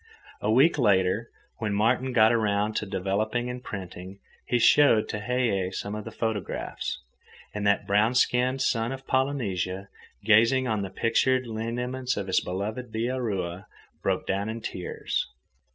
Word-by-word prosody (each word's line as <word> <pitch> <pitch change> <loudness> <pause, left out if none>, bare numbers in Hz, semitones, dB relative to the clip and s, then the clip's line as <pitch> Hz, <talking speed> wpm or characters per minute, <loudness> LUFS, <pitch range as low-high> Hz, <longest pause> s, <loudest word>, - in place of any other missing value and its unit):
A 105 - -1
week 140 +6 +4
later, 100 0 +2 0.3
when 105 -2 -1
Martin 125 +5 +2
got 110 -2 +5
around 105 -1 +1
to 105 - -2
developing 110 +6 -1
and 125 0 -8
printing, 95 -2 -7 0.3
he 120 - +2
showed 115 -2 +5
Tehei 105 -4 -1
some 100 +2 -4
of 105 0 -5
the - - -7
photographs. 110 -4 -3 0.5
And 105 -1 -1
that 100 - +2
brown 105 +5 +2
skinned 125 +1 +2
son 115 -1 0
of 135 0 -7
Polynesia, 100 -9 -1 0.4
gazing 115 +5 +4
on 110 -3 0
the 95 - -4
pictured 130 +6 +1
lineaments 125 +3 -3
of 100 - -2
his 95 -1 +2
beloved 110 +6 -4
Bihaura 105 -6 -2 0.3
broke - - 0
down 100 +2 -1
in 115 +1 -4
tears. 90 -4 -3
110 Hz, 145 wpm, -27 LUFS, 100-125 Hz, 0.5 s, got